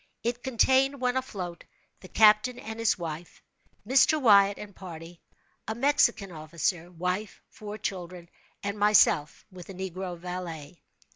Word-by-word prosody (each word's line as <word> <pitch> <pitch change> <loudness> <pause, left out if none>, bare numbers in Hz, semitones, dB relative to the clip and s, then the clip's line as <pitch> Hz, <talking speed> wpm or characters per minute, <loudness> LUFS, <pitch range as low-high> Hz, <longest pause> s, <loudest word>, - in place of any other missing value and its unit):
It 235 +1 -2
contained, 265 +2 +2
when 250 0 0
afloat, 190 -10 -5 0.4
the 185 - -13
captain 215 +5 +4
and 220 -1 -8
his 230 -2 +2
wife, 165 -1 -7 0.4
Mr. 275 +4 +4
Wyatt 200 -5 +5
and 205 -2 -10
party, 170 -2 -10 0.5
a 220 - -3
Mexican 240 -6 +2
officer, 165 +2 -3
wife, 180 +4 -3
four 210 -3 -8
children, 180 -4 -6 0.4
and 200 +1 -4
myself, 205 -7 +3
with 180 -1 -12
a 195 - -8
negro 185 -1 -5
valet. 175 -3 -7
195 Hz, 135 wpm, -27 LUFS, 175-230 Hz, 0.5 s, Wyatt